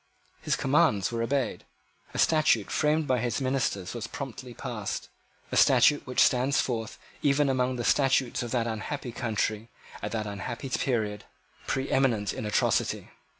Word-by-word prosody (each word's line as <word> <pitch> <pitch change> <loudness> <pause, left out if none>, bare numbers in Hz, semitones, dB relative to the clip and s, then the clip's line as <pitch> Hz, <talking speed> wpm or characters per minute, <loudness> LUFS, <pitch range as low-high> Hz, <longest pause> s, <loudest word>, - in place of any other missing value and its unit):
His - - 0
commands 100 -1 +2
were 115 -1 -2
obeyed. 130 0 -1 0.5
A - - -7
statute 150 -9 +3
framed 155 +1 +2
by 130 -3 +1
his 120 +3 -1
ministers 130 -8 -1
was 115 -1 -5
promptly 130 -2 -7
passed, - - -5 0.4
a - - -2
statute 145 -3 +5
which 125 - +2
stands 130 +2 +2
forth 115 -3 -2 0.2
even 140 0 +3
among 130 -1 +1
the 120 - -3
statutes 135 -1 +2
of 120 - -4
that 120 -1 0
unhappy 120 +4 -4
country 110 -1 -2 0.3
at - - -4
that 110 -2 -2
unhappy 105 +6 -5
period, 110 -6 -1 0.4
preeminent 130 -6 +1
in 110 - -4
atrocity. 105 - 0
125 Hz, 150 wpm, -28 LUFS, 110-135 Hz, 0.5 s, statute